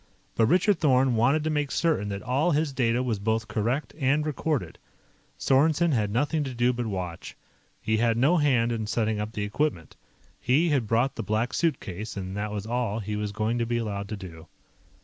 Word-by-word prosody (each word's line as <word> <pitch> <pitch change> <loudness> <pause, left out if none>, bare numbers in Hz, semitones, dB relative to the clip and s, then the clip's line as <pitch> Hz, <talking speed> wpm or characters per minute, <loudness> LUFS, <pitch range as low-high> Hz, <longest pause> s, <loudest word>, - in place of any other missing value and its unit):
But 115 - +3
Richard 185 - +3
Thorn 130 -4 +3
wanted 130 +7 +3
to 155 - -1
make 150 -2 0
certain 155 -13 0
that 100 0 -5
all 135 +8 +1
his 150 -2 +1
data 120 -1 +1
was 115 -5 -1
both 110 +2 -1
correct 120 +7 -2
and 145 +2 +2
recorded. 145 - -2 0.6
Sorensen 155 +5 +3
had 105 -4 +1
nothing 145 +8 0
to 130 -3 -5
do 120 +1 +2
but 120 -1 -3
watch. 90 -5 -5 0.4
He 110 0 0
had 115 0 +2
no 145 +9 +4
hand 125 -6 +2
in 110 -2 -2
setting 110 -1 0
up 105 +1 -4
the 105 - -3
equipment. 105 - -2 0.4
He 150 +7 +2
had 135 -7 +1
brought 120 +5 +1
the - - -1
Black 110 +3 -1
Suitcase, 110 - -2
and 95 0 -5
that 105 +1 -3
was 105 -1 -4
all 115 -2 -1
he 105 -1 -4
was 105 -1 -2
going 110 +3 -1
to 115 - +1
be 120 0 0
allowed 100 -3 -3
to 105 - -4
do. 85 -4 -10
120 Hz, 200 wpm, -26 LUFS, 105-140 Hz, 0.6 s, no